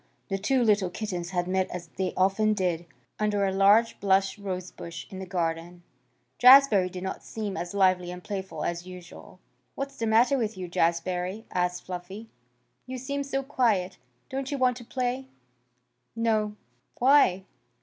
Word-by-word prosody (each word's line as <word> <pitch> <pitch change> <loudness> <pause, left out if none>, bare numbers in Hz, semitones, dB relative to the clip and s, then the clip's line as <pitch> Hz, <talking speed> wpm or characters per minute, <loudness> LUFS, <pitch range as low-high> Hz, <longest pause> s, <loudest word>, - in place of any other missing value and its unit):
The 195 0 -1
two 250 +5 +2
little 205 -4 +3
kittens 180 -3 -4
had 175 -1 -1
met 185 0 0
as 175 -2 -7
they 185 +4 -3
often 205 +3 +2
did, 175 -3 -1 0.3
under 205 -1 +1
a 190 - 0
large 200 +4 +4
blush 195 0 +2
rosebush 180 -4 -6
in 190 - -7
the 190 - -7
garden. 175 0 -3 0.6
Jazbury 250 -7 +7
did 180 0 -7
not 190 - -5
seem 210 -3 -5
as 175 +1 -5
lively 185 -2 +3
and 180 0 -8
playful 190 -6 -5
as 175 +1 -3
usual. 180 -2 -12 0.4
"What's 275 0 -5
the 225 - -1
matter 240 +5 +4
with 220 -3 -2
you, 185 -1 -5
Jazbury?" 180 +4 -1
asked 180 0 -1
Fluffy. 185 +5 -8 0.6
"You 255 0 -5
seem 280 +3 -3
so 275 -1 -2
quiet. 215 -9 0 0.3
Don't 270 0 -4
you 285 - -2
want 255 -1 +2
to 245 - -10
play?" 255 +2 -2 0.9
"No." 215 -2 0 0.4
"Why?" 245 -8 +4
195 Hz, 160 wpm, -27 LUFS, 180-230 Hz, 0.9 s, Jazbury